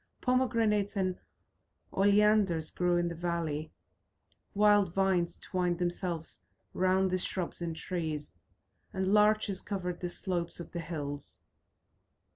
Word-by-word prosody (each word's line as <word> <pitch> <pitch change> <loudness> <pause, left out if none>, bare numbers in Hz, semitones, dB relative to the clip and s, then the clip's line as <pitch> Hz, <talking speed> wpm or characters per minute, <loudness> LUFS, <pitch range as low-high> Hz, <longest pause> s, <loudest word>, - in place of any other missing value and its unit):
Pomegranates 230 -5 +1
and 185 -1 0 0.7
oleanders 200 -4 +3
grew 180 -1 +1
in 175 0 +1
the 170 - -3
valley, 165 -3 -2 0.8
wild 205 -3 +4
vines 190 -3 +1
twined 180 -2 -1
themselves 175 -2 -3 0.3
round 185 0 +2
the 185 - +1
shrubs 180 -1 -3
and 165 -1 -3
trees, 160 -3 -4 0.6
and 190 0 0
larches 210 -2 +3
covered 180 -4 -4
the 175 - -3
slopes 175 -2 -2
of 170 - -8
the 170 - -4
hills. 145 -4 -5
180 Hz, 115 wpm, -31 LUFS, 170-200 Hz, 0.8 s, wild